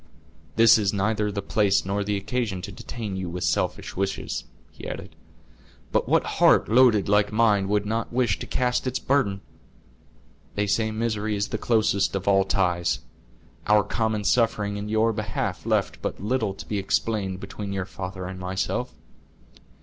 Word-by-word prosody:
"This 115 0 +7
is 100 -2 +1
neither 105 +1 0
the 100 -1 -4
place 100 -2 +2
nor 100 +1 -1
the 105 0 -1
occasion 100 -2 -2
to - - -6
detain 110 -5 -6
you 95 -2 -3
with 90 +1 -4
selfish - - -1
wishes," 95 +1 -2 0.3
he - - -9
added; - - -7 0.8
"but - - +1
what - - +4 0.2
heart - - +6
loaded 115 -3 +5
like 105 0 +3
mine 105 -3 +3
would 105 0 +1
not 115 +2 -2
wish 120 -5 +1
to - - -6
cast 125 0 0
its 130 - -1
burden? 105 -8 0 1.1
They 105 - +1
say 110 +2 +1
misery 110 -1 -1
is 100 +1 -1
the - - -3
closest 105 -4 +2
of 95 0 -3
all 95 -1 +4
ties; 90 -3 +1 0.7
our 105 -1 +5
common 110 0 -1
suffering 105 -1 +1
in 105 +1 -5
your 110 +1 +2
behalf 105 -1 -3
left - - 0
but - - -3
little 110 -1 -1
to - - -9
be 105 - -1
explained 95 -1 -1
between 100 +1 -6
your 95 -1 -2
father 95 0 -6
and 95 0 -6
myself." 95 +1 -2
105 Hz, 165 wpm, -25 LUFS, 95-110 Hz, 1.1 s, This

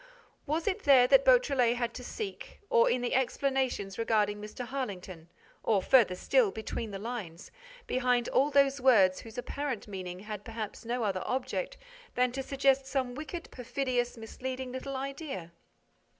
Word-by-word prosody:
Was 315 +3 -1
it 395 -3 0
there 265 -3 +7
that - - +5
Beautrelet 280 - +4
had 240 -1 -2
to 250 - -8
seek, 405 - -7
or 230 - +5
in 250 - +1
the 245 - -1
explanations 260 -6 0
regarding 210 -2 +1
Mr. 210 +4 -6
Harlington, 190 -10 -6 0.3
or 210 -3 +2
further 210 -2 +4
still, 460 - +3
between 220 - -5
the 200 - -5
lines, 205 -6 -6 0.3
behind 250 -2 +1
all 275 +3 +3
those 275 -1 +3
words 200 -8 +5
whose 225 0 -11
apparent 260 -2 -4
meaning 185 -2 -6
had 210 -1 -6
perhaps 225 0 -6
no 240 +1 -1
other 195 -3 -1
object - - -2 0.4
than 250 0 +2
to 270 +2 -3
suggest 270 0 +2
some 260 -2 -1
wicked, 310 +5 -7
perfidious, 250 -1 -2
misleading 255 +3 -5
little 265 +2 -5
idea? 270 - -5
250 Hz, 155 wpm, -30 LUFS, 215-275 Hz, 0.4 s, there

